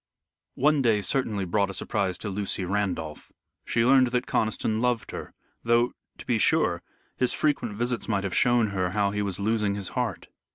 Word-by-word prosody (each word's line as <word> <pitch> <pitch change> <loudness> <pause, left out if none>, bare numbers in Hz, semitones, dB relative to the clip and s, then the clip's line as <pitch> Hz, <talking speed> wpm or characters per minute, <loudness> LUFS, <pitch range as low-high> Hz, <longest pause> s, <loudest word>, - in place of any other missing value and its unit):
One 150 +1 +3
day 110 -5 +2
certainly 105 -2 -1
brought 100 +2 +1
a 95 - -5
surprise 95 -1 -1
to 105 - -5
Lucy 95 -1 -2
Randolph. 90 -5 -3 0.3
She 115 - +1
learned 130 0 +5
that 125 +1 -1
Conniston 110 0 0
loved 120 -4 0
her, - - -8 0.3
though, 120 +1 +2 0.2
to - - -10
be - - +1
sure, - - +2 0.4
his 125 - +1
frequent 140 -8 0
visits 120 +2 -2
might 100 -3 0
have 95 -2 -3
shown 120 -3 +3
her 95 -2 -1
how 100 -1 +1
he 105 0 -2
was 100 -2 -2
losing 105 -1 0
his 100 -2 -4
heart. 120 -8 -3
105 Hz, 180 wpm, -26 LUFS, 100-120 Hz, 0.4 s, learned